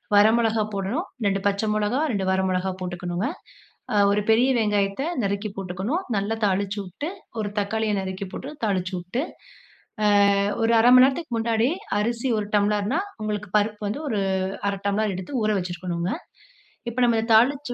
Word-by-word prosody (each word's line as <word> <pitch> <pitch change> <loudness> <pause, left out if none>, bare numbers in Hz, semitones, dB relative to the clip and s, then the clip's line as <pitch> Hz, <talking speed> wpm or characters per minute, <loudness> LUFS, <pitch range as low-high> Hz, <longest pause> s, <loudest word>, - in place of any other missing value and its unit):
வர 205 +1 +7
மிளகாய் 220 -2 +1
போடணும், 200 - -2 0.2
2 195 0 +1
பச்சை 200 +2 0
மிளகாய், 240 +9 0
2 195 -2 -1
வர 190 0 +2
மிளகாய் 185 0 -1
போட்டுக்கணுங்க. 180 +2 -3 0.7
அ - - +1 0.2
ஒரு 210 - +2
பெரிய 240 +4 +5
வெங்காயத்தை 205 +3 0 0.2
நறுக்கி 200 +2 -1
போட்டுக்கணும். 195 - -3
நல்லா 200 +3 0
தாளிச்சு 200 +1 0
வுட்டு 195 - -6 0.3
ஒரு 205 -1 -1
தக்காளிய 215 +1 0
நறுக்கி 190 +1 -4
போட்டு 270 - -6
தாளிச்சு 190 -3 0
வுட்டு, 180 +8 -3 1.2
அ - - +2 0.2
ஒரு 225 - +3
1/2 235 +2 +6
மணி 255 - +9
நேரத்துக்கு 270 -1 -1
முன்னாடி 225 +1 +1 0.3
அரிசி 235 +4 -1
1 205 - -3
டம்ளர்னா 210 - +1 0.2
உங்களுக்கு 210 -2 -3
பருப்பு 210 0 -1
வந்து 230 +9 -3
ஒரு 215 -4 0 0.5
1/2 200 - -2
டம்ளர் 210 0 +1
எடுத்து 190 +8 -4
ஊற 215 - +2
வச்சுருக்கணுங்க. 175 0 -3 0.8
இப்போ 235 +2 -5
நம்ம 235 -1 +3
இந்த 225 +1 -3
தாளிச்சு 260 +3 +3
210 Hz, 160 wpm, -24 LUFS, 195-230 Hz, 1.2 s, மணி